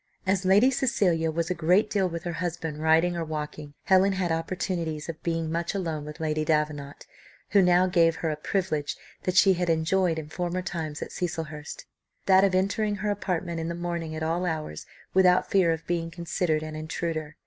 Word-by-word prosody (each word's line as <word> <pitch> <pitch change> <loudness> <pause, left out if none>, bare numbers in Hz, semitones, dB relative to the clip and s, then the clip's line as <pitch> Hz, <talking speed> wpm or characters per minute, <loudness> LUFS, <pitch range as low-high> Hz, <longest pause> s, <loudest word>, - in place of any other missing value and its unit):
As 190 0 +1
Lady 205 +8 +5
Cecilia 195 -11 +1
was 170 +2 -1
a - - +3
great 180 +5 +3
deal 195 -3 +1
with 170 -1 -5
her 175 - -3
husband 165 -2 -4
riding 160 +3 +3
or 170 - -2
walking, 150 -2 -6
Helen 190 +1 +4
had 185 -3 -1
opportunities 165 -2 -2
of 165 -2 -6
being 165 -1 -2
much 170 +3 -2
alone 160 -6 -3
with 150 0 -9
Lady 155 -1 -1
Davenant, 150 -2 -1 0.5
who 200 - +6
now 180 0 +5
gave 165 -3 +3
her 160 -1 -2
a - - -2
privilege 155 -2 -2 0.3
that 185 - 0
she 190 0 +7
had 180 -1 -1
enjoyed 165 +1 +2
in 155 -2 -5
former 175 +3 -3
times 160 -5 -4
at - - -9
Cecilhurst, 160 -4 -5 0.4
that 190 0 +6
of 195 -2 +3
entering 205 +3 +1
her 205 +1 -1
apartment 175 -4 -2
in 165 - -3
the 170 - -3
morning 170 -2 -4
at 160 - -4
all 170 +3 0
hours 155 - -4 0.3
without 185 -1 +4
fear 185 -4 +4
of 165 0 -3
being 170 -1 -1
considered 165 -1 -1
an 155 0 -6
intruder. 155 0 -4
170 Hz, 190 wpm, -27 LUFS, 160-185 Hz, 0.5 s, she